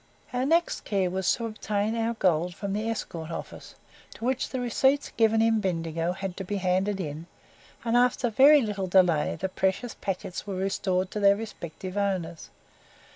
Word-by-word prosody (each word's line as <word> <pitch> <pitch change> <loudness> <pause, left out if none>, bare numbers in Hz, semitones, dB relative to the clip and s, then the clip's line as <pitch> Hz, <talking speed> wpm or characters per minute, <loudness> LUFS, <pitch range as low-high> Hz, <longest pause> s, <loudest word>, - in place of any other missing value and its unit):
Our 250 +2 0
next 335 +3 +1
care 190 -3 0
was 190 0 +1
to 230 - -5
obtain 215 0 -2
our 230 0 -1
gold 175 -3 +1
from 200 -1 -4
the 215 +2 -1
Escort 170 -7 -4
office; 165 - -8 0.4
to - - -13
do - - -3
which 260 0 0
the 260 - -3
receipts 265 +3 +1
given 225 -1 +3
in 225 -1 +3
Bendigo 165 -3 -1
had 190 -1 -5
to 195 - -4
be 205 +2 -3
handed 190 +1 0
in, 160 -1 -5 0.6
and 230 0 +1
after 245 0 +3
very 280 +5 +7
little 200 -3 -2
delay 175 -4 +3
the 190 - -1
precious 190 +5 -1
packets 185 0 -5
were 195 - -3
restored 185 -1 -1
to 210 - -3
their 200 -1 +5
respective 190 -3 -7
owners. 185 -5 -2
200 Hz, 180 wpm, -27 LUFS, 180-225 Hz, 0.6 s, very